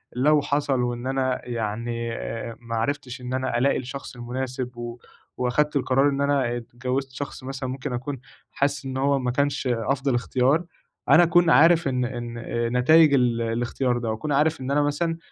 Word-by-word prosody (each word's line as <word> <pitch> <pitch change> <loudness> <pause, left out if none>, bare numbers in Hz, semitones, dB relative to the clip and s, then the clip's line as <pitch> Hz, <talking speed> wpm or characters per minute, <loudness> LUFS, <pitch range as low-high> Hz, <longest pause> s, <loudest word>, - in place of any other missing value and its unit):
لو 145 +4 +4
حصل 140 -3 0
وإن 120 0 -2
أنا 130 -1 0
يعني 115 0 -3 0.5
ما 115 -1 -5
عرفتش 130 +2 -3
إن 125 +1 -5
أنا 130 -2 -1
ألاقي 135 +3 +2
الشخص 130 +1 -7
المناسب 125 0 -5
و 120 0 -6 0.4
وأخدت 145 +5 +1
القرار 135 +1 +3
إن 140 0 -2
أنا 135 -4 +1
اتجوّزت 125 +3 -4
شخص 130 0 -7
مثلًا 130 0 -5
ممكن 130 +1 -4
أكون 130 +2 -4 0.3
حاسس 140 0 -1
إن 130 0 -4
هو 140 +1 +2
ما 125 -1 -1
كانش 140 +1 0
أفضل 130 +3 0
إختيار، 130 +6 +1 0.5
أنا 175 - +8
أكون 175 0 +4
عارف 165 0 +5
إن 125 -2 0
إن 120 -1 -5
آآ 115 0 -2
نتايج 145 +5 +5
ال 120 -3 +2
الإختيار 120 +2 -1
ده 115 -2 -2
وأكون 115 +7 -4
عارف 150 +1 +2
إن 130 +1 -3
أنا 145 +1 +3
مثلًا 165 +3 -1
130 Hz, 170 wpm, -24 LUFS, 120-140 Hz, 0.5 s, أنا